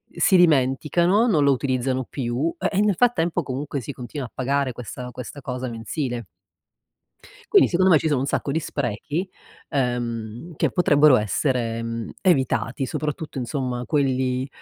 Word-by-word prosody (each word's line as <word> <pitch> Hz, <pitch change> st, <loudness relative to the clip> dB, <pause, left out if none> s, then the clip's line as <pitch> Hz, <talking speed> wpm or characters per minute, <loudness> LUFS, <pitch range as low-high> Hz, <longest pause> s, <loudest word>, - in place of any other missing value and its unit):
si 190 Hz, -, +4 dB
dimenticano, 170 Hz, -, +3 dB
non 160 Hz, -10 st, +3 dB
lo 140 Hz, -, +5 dB
utilizzano 130 Hz, -1 st, 0 dB
più 130 Hz, +5 st, -2 dB
e -, -, +1 dB
e, -, -, +4 dB
nel 210 Hz, -1 st, +3 dB
frattempo, 175 Hz, -8 st, +2 dB
comunque, 140 Hz, +1 st, -4 dB
si 145 Hz, -, -6 dB
continua 125 Hz, +2 st, -6 dB
a -, -, -23 dB
pagare 135 Hz, 0 st, 0 dB
questa 125 Hz, +1 st, -7 dB
questa 130 Hz, +3 st, -8 dB
cosa 130 Hz, -1 st, -4 dB
mensile. 120 Hz, +1 st, -4 dB, 1.3 s
Quindi, -, -, +7 dB
secondo 185 Hz, +1 st, +3 dB
me, 160 Hz, -, +7 dB
ci -, -, -1 dB
sono 145 Hz, -4 st, +1 dB
un -, -, 0 dB
sacco 140 Hz, -, -1 dB
di 160 Hz, -, +1 dB
sprechi, 145 Hz, -, -3 dB, 0.4 s
ehm, 120 Hz, +1 st, -3 dB
che -, -, +1 dB
potrebbero 150 Hz, -6 st, +5 dB
essere, 115 Hz, -, 0 dB
ehm, 115 Hz, 0 st, -4 dB
evitati, 135 Hz, -5 st, +1 dB
soprattutto, 150 Hz, +4 st, -4 dB
insomma, 125 Hz, -1 st, -3 dB
quelli, 130 Hz, -3 st, 0 dB
135 Hz, 150 wpm, -23 LUFS, 125-155 Hz, 1.3 s, Quindi